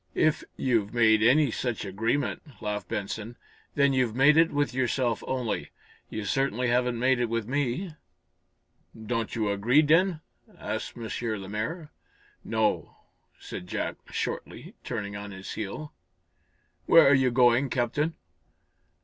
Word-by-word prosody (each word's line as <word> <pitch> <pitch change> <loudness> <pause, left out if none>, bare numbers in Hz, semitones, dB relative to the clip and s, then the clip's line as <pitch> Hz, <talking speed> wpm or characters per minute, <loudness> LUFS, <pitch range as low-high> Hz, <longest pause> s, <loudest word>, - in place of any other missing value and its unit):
"If 155 -1 +2
you've 115 -4 0
made 110 -2 +5
any 130 +4 +4
such 120 -2 -3
agreement," 115 - -2
laughed 105 -3 -4
Benson, 110 +4 -4 0.4
"then 140 -1 +3
you've 125 -4 +1
made 140 +4 +6
it 165 +1 +5
with 145 -4 0
yourself 125 -2 0
only. 125 -4 -2 0.4
You 110 -1 -5
certainly 125 +1 0
haven't 125 0 +1
made 130 +1 +2
it 120 -1 0
with 115 -2 -2
me." 145 +6 -1 1.1
"Don't 115 +1 -3
you 110 -3 0
agree, 120 +9 +3
then?" 165 +2 +3 0.4
asked - - -5
M. 115 -1 -5 0.3
Lemaire. 110 - -5 0.5
"No," 110 -1 -1 0.4
said 90 - -8
Jack, - - -3
shortly, - - -5
turning 100 -1 -4
on 100 0 -6
his 95 -1 -8
heel. 110 +9 -6 0.9
"Where 165 -4 +8
are 140 - +6
you 130 -2 +4
going, 125 +2 +4
Captain?" 145 +7 0
120 Hz, 130 wpm, -27 LUFS, 110-140 Hz, 1.1 s, Where